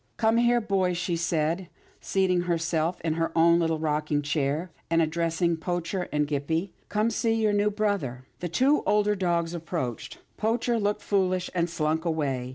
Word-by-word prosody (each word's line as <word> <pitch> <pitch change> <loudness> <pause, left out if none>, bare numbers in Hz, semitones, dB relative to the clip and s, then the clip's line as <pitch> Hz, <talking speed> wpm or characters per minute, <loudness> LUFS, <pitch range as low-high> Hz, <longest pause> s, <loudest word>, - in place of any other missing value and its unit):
" - - -44
Come 225 +1 +4
here, 240 0 +4
boys," 190 -5 0
she 175 0 -1
said, 165 +1 -1 0.3
seating 185 -2 +1
herself 170 -1 0
in 160 -1 0
her 165 0 -1
own 170 +1 +5
little 165 -1 +1
rocking 150 -1 0
chair, 145 +4 -1 0.2
and 165 0 +3
addressing 165 +1 +1
Poacher 175 +2 -3
and 150 0 +1
Gippie. 160 +6 -1
" - - -38
Come 215 +2 +1
see 225 0 +1
your 215 -2 +2
new 205 +1 +3
brother." 200 - -2
The 175 - -3
two 265 - +3
older 210 0 +3
dogs 175 -3 0
approached. 160 -8 -4 0.2
Poacher 230 +2 0
looked 205 0 -1
foolish, 185 -2 0
and 175 -1 0
slunk 160 -1 -1
away. 140 -7 -1
170 Hz, 170 wpm, -27 LUFS, 160-200 Hz, 0.3 s, own